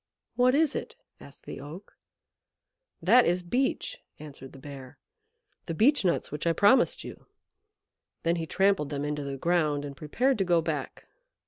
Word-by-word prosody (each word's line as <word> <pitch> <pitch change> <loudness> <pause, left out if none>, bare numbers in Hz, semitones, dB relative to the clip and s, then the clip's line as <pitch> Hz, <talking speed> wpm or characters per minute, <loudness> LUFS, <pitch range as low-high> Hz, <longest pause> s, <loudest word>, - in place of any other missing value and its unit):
"What 250 +1 +4
is 310 -1 +3
it?" - - -5 0.2
asked 140 - -15
the - - -7
Oak. 160 +8 -11 1.1
"That 235 +8 +6
is 180 +1 0
Beech" 265 - -1 0.2
answered 140 -3 -11
the - - -13
Bear 135 0 -10 0.7
"the 165 - -3
Beech 270 - +4
nuts 175 -3 0
which 150 +3 -3
I 165 - +3
promised 245 +8 +3
you." - - -11 1.0
Then 170 +1 +1
he 165 -1 -4
trampled 190 -6 +1
them 145 -1 -3
into 150 0 -3
the 140 -1 -5
ground 155 -2 0
and 140 -1 -7
prepared 240 - 0
to - - +3
go 175 -2 +3
back. 160 - -4
170 Hz, 160 wpm, -28 LUFS, 145-205 Hz, 1.1 s, That